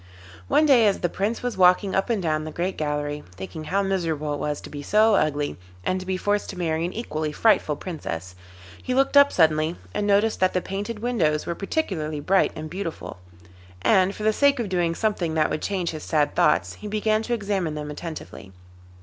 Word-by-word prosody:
One 305 - +4
day, 250 -7 +6
as 200 - +1
the 175 - +1
Prince 210 +8 -2
was 245 -4 -2
walking 185 +2 +4
up 195 - 0
and 230 -3 +1
down 155 -2 0
the 155 - -5
great 180 +4 -2
gallery, 150 -1 -3
thinking 95 - -7
how 195 +5 0
miserable 165 -6 -1
it 145 - -4
was 150 -1 -2
to - - -10
be 145 - -6
so 215 +8 +4
ugly, 145 -5 0 0.3
and 185 - 0
to 185 - -9
be 190 -1 -1
forced 205 +2 -1
to 190 - -7
marry 165 -2 -1
an 175 - -3
equally 155 -9 -3
frightful 155 -4 +2
Princess, 95 - -6 0.5
he 255 - -2
looked 270 +2 +2
up 285 0 +7
suddenly 160 0 +2 0.2
and 210 0 -1
noticed 205 +2 +2
that 185 0 +2
the 185 - +2
painted 205 +4 -5
windows 160 -12 +1
were 170 - -2
particularly 170 - -2
bright 190 +6 +2
and 155 0 -6
beautiful, 165 - -6 0.6
and 190 +1 +3
for 215 - -7
the 215 0 +3
sake 280 +2 +3
of 225 -4 -2
doing 175 -2 0
something 180 -7 -1
that 155 -1 +2
would - - -2
change 185 -4 -1
his 155 -1 -7
sad 150 -2 +1
thoughts 85 +1 +2
he 210 - -6
began 215 +1 +1
to 240 +2 -1
examine 195 -7 -2
them 150 0 -5
attentively. 150 - -8
180 Hz, 210 wpm, -24 LUFS, 155-210 Hz, 0.6 s, up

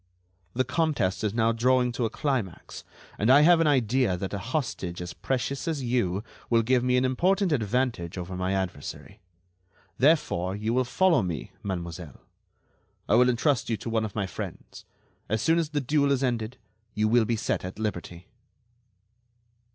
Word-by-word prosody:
The 130 - +2
contest 140 - 0
is 105 - +1
now 115 0 +3
drawing 125 +2 +2
to 120 0 -1
a - - 0
climax, 120 - -3 0.4
and 110 - +2
I 140 +3 +8
have 170 +2 +6
an 165 - +3
idea 125 -7 +2
that 95 +2 -5
a 100 - -2
hostage 105 - -3
as 90 -1 -6
precious 135 +4 -3
as 155 -5 -2
you 110 -6 0 0.3
will 115 -1 +3
give 125 +1 +2
me 125 0 +2
an 125 - +2
important 185 +8 +2
advantage 115 - -1
over 90 +1 -5
my 90 +1 -1
adversary. 95 -6 -4 0.8
Therefore, 110 - +2
you 110 +2 -2
will 130 +1 +2
follow 175 +1 +3
me, 80 -10 -4
mademoiselle; 85 -4 -6 0.9
I - - +1
will 125 +1 +5
entrust 125 +1 +1
you 115 - 0
to 115 +3 -6
one 110 -1 +1
of 105 -2 -5
my 100 -3 0
friends. 95 - -8 0.4
As 110 +1 0
soon 165 +1 +3
as 160 -3 -1
the 150 -1 -1
duel 140 +1 +2
is 135 -1 +1
ended, 120 -1 -2 0.4
you 105 0 +2
will 115 +1 +4
be 115 - 0
set 110 - -2
at 90 +1 -7
liberty." 90 -5 -5
120 Hz, 175 wpm, -27 LUFS, 95-135 Hz, 0.9 s, I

